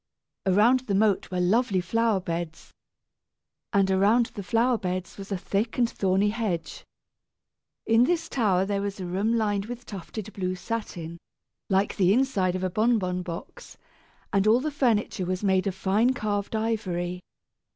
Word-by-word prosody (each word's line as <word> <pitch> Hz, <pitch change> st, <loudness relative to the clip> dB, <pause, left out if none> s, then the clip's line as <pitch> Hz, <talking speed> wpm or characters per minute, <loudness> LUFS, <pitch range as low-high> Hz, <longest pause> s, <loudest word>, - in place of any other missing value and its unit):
Around 215 Hz, +7 st, +5 dB
the 200 Hz, -, +1 dB
moat 205 Hz, -1 st, +2 dB
were 180 Hz, -, -2 dB
lovely 200 Hz, +2 st, +2 dB
flower 225 Hz, +3 st, +1 dB
beds, 170 Hz, -2 st, -5 dB, 1.0 s
and 195 Hz, -2 st, +3 dB
around 210 Hz, +5 st, +3 dB
the 205 Hz, -, -5 dB
flower 230 Hz, +4 st, +1 dB
beds 185 Hz, -2 st, -4 dB
was 195 Hz, 0 st, -9 dB
a 195 Hz, -, 0 dB
thick 200 Hz, +5 st, -2 dB
and 240 Hz, -2 st, +3 dB
thorny 195 Hz, -1 st, +1 dB
hedge. 210 Hz, -6 st, -3 dB, 1.0 s
In 225 Hz, +2 st, +5 dB
this 330 Hz, +2 st, 0 dB
tower 195 Hz, -7 st, +1 dB
there 200 Hz, 0 st, -1 dB
was 200 Hz, 0 st, -4 dB
a 185 Hz, -, -4 dB
room 195 Hz, +6 st, 0 dB
lined 205 Hz, -2 st, 0 dB
with 245 Hz, 0 st, -7 dB
tufted 210 Hz, +2 st, -7 dB
blue 185 Hz, -1 st, -2 dB
satin, 180 Hz, -5 st, -5 dB, 0.5 s
like 195 Hz, +1 st, +1 dB
the 190 Hz, 0 st, +4 dB
inside 205 Hz, -8 st, +1 dB
of 185 Hz, -, -3 dB
a 185 Hz, -, +1 dB
bonbon 205 Hz, -4 st, +1 dB
box, 180 Hz, -, -8 dB, 0.6 s
and 200 Hz, +1 st, +3 dB
all 225 Hz, +3 st, +5 dB
the 305 Hz, +3 st, -2 dB
furniture 220 Hz, -9 st, 0 dB
was 185 Hz, +2 st, -2 dB
made 190 Hz, 0 st, +2 dB
of 190 Hz, -, -2 dB
fine 215 Hz, +7 st, +2 dB
carved 205 Hz, -1 st, -2 dB
ivory. 185 Hz, -6 st, -2 dB
200 Hz, 160 wpm, -26 LUFS, 185-225 Hz, 1.0 s, Around